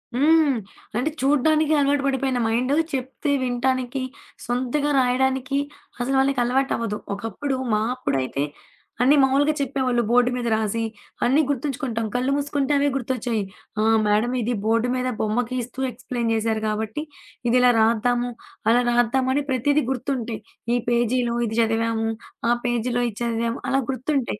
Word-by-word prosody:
హ్మ్. 300 0 +4 0.4
అంటే 255 +6 +1
చూడ్డానికి 305 +3 +3
అలవాటు 280 0 +2
పడిపోయిన 265 -2 0
మైండు 250 +5 +1 0.2
చెప్తే 265 +3 -2
వినటానికి 255 +1 -1 0.4
సొంతగా 255 +4 0
రాయడానికి 265 +1 +1 0.4
అసలు 265 +3 0
వాళ్ళకి 270 0 +2
అలవాటు 265 +3 +1
అవ్వదు. 225 -3 -2 0.2
ఒకప్పుడు 225 +7 -3 0.2
మా 210 - +3 0.2
అప్పుడైతే, 140 - -1 0.6
అన్నీ 270 +4 +6
మామూలుగా 280 +3 +3
చెప్పేవాళ్ళు 260 -3 0
బోర్డు 245 +1 +4
మీద 240 - -2
రాసి 220 +1 -1 0.4
అన్నీ 270 +5 +4
గుర్తుంచుకుంటాం. 265 -4 -2
కళ్ళు 255 +2 +1
మూసుకుంటే 285 0 0
అవే 285 +1 +2
గుర్తొచ్చాయి. 240 -4 -2 0.4
ఆ! - - +2 0.2
మేడమ్ 215 +4 +2
ఇది 240 +2 -1
బోర్డు 230 +2 +2
మీద 255 0 -1
బొమ్మకి 235 +3 -1
ఇస్తూ 250 +2 -10
ఎక్స్‌ప్లైయిన్ 240 -1 -3
జేశారు 220 0 0
కాబట్టి 220 +6 -3 0.5
ఇది 250 - +4
ఇలా 250 0 +6
రాద్దాము. 240 +2 +2 0.4
అలా 240 +2 +5
రాద్దామని 260 +4 +2
ప్రతీదీ 285 +4 +2
గుర్తుంటాయి. 240 -4 -3 0.3
ఈ - - +3
పేజీలో 240 0 +1
ఇది 220 - -4
చదివాము. 225 0 0 0.4
ఆ - - +5
పేజీలో 240 0 0
ఇది 210 - -18
చదివాము 230 0 -1
అలా 270 - +2
గుర్తుంటాయి. 260 -3 -2
250 Hz, 140 wpm, -23 LUFS, 230-270 Hz, 0.6 s, అన్నీ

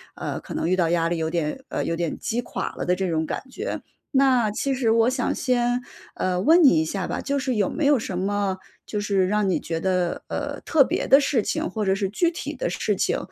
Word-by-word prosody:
呃， - - -4
可 - - -9
能 165 - -1
遇 185 - +2
到 170 -2 +2
压 165 -1 +1
力 170 - -1
有 160 0 -1
点 165 - -2
呃， - - -2
有 165 - -2
点 170 -2 -2
击 235 +2 -2
垮 235 - -4
了 - - -3
的 180 +1 +2
这 190 -1 -2
种 160 -1 0
感 - - -3
觉。 430 - -4 0.3
那 255 -5 +4
其 270 +5 -1
实 250 -4 +1
我 230 +1 +4
想 255 -2 0
先， 245 -1 +1 0.3
呃， 180 -1 0
问 330 - +6
你 160 -12 +6
一 - - +1
下 185 +3 -3
吧， - - -3
就 280 0 -1
是 255 -2 -1
有 205 -2 +1
没 310 - -2
有 285 0 +5
什 190 -5 -4
么 200 0 -1 0.3
就 210 - -3
是 200 -2 +1
让 210 -1 +1
你 - - +2
觉 165 -1 -3
得， 180 -1 0
呃， - - -4
特 305 -4 +5
别 - - -2
的 275 +2 +7
事 270 -4 +1
情 - - -2
或 210 +2 -2
者 190 0 +2
是 195 -1 -1
具 335 - +1
体 335 - -5
的 - - -2
事 - - -1
情， - - 0
205 Hz, 265 characters per minute, -24 LUFS, 180-255 Hz, 0.3 s, 的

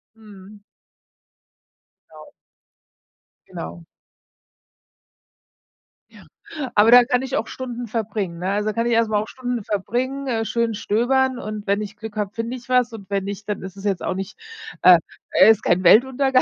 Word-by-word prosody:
Mhm. 205 -2 -15 1.5
Genau. - - -14 1.2
Genau. 170 -1 -8 2.2
Ja. - - -17 0.5
Aber 215 +3 +5
da 245 0 +9
kann 250 0 0
ich 265 +1 -3
auch - - -1
Stunden 245 -2 -6
verbringen, 205 -6 -3
ne? 185 +2 -2
Also, 210 +1 -1
da - - -3
kann 230 0 -1
ich 240 - +1
erstmal 220 -2 +2
auch 215 - -6
Stunden 245 -4 -4
verbringen, 255 +7 -2
äh, 225 -3 -1
schön 235 -1 -1
stöbern 255 +5 +1
und, 215 -3 -6
wenn 200 +1 +1
ich 210 0 -7
Glück 220 0 -9
habe, 205 -1 -3
finde 230 +2 -4
ich 250 0 -12
was 250 -2 +2
und 205 -3 -10
wenn 195 -1 -1
nicht, 200 +1 -7
dann 205 - -3
ist 190 -1 -8
es 195 - -11
jetzt 195 -3 -1
auch 175 - -2
nicht 195 0 -6 0.4
äh, 180 -1 +8 0.5
ist 225 -1 +4
kein 180 +1 +2
Weltuntergang, 260 +7 +4
220 Hz, 160 wpm, -22 LUFS, 200-245 Hz, 2.2 s, da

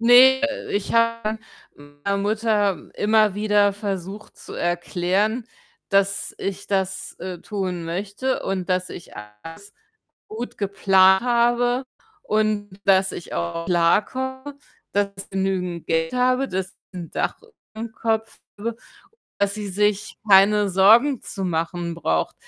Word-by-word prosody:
Ne, 250 +3 +7
äh, 285 -1 -2
ich 205 - -2
habe 230 -1 +1 0.4
meiner 145 +7 -4
Mutter 210 -1 0
immer 215 -1 +3
wieder 205 -1 +3
versucht 200 0 -6
zu - - -11
erklären, 185 +6 0 0.4
dass 195 0 +1
ich 195 0 -4
das, 190 -1 -2
äh, 185 -2 -5
tun 185 -3 -4
möchte 200 +9 -2
und 190 -1 -3
dass 185 0 0
ich 170 - -10
alles 105 - -11 0.6
gut 230 +3 -7
geplant 190 -1 +4
habe 245 +1 +2 0.4
und 210 -2 -1
dass 190 0 +4
ich 175 - -8
auch 85 - -3
klarkomme, 260 +11 0 0.4
dass 200 0 +1
ich 195 - -9
genügend 190 -3 -2
Geld 165 +2 0
habe, 255 +2 +2
dass 190 -2 -4 0.2
ich 185 - -9
'n 170 - -8
Dach - - -1 0.4
überm 225 +1 -6
Kopf 225 0 -2 0.2
habe, 225 +2 -3 0.6
dass 200 0 +1
sie 210 -2 -5
sich 205 +1 0
keine 205 +1 +6
Sorgen 220 +8 +5
zu 195 - -5
machen 170 0 -2
braucht. 80 - -1
200 Hz, 130 wpm, -23 LUFS, 185-220 Hz, 0.6 s, Ne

